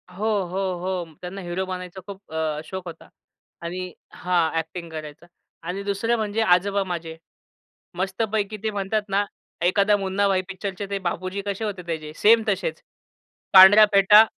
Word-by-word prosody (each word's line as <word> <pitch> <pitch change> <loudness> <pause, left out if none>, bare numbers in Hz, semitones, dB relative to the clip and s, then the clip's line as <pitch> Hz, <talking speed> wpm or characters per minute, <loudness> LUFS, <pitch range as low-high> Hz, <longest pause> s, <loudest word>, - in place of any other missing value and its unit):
हो, 210 - -3 0.2
हो, 185 +3 -4 0.2
हो. 185 -1 -2 0.2
त्यांना 185 +2 -6
हीरो 175 +2 -3
बनायचा 185 0 -6
खूप 195 -4 -11
अ, 155 -1 -1
शोक 190 +2 -7
होता. 165 -1 -10 0.5
आणि 180 +1 -5 0.2
हां, 175 -3 +1
अ‍ॅक्टिंग 165 +1 -4
करायचा. 155 +1 -8 0.4
आणि 195 +3 -3
दुसरं 200 +4 0
म्हणजे 215 +1 -1
आजोबा 200 +1 +3
माझे. 170 -3 -5 0.8
मस्तपैकी 205 +2 -1
ते 220 - 0
म्हणतात 205 +1 -1
ना, 200 +1 +1 0.4
एखादा 200 +3 +3
मुन्ना 195 +1 0
भाई 190 -1 +2
पिक्चरचे 195 0 -5
ते 200 0 -2
बापूजी 185 +3 -4
कसे 200 +2 -3
होते 200 -4 -4
त्याचे, 155 -2 -5
सेम 225 +4 +5
तसेच. - - -2 0.7
पांढऱ्या 195 +3 +10
फेटा 205 +2 +8
190 Hz, 150 wpm, -24 LUFS, 175-200 Hz, 0.8 s, पांढऱ्या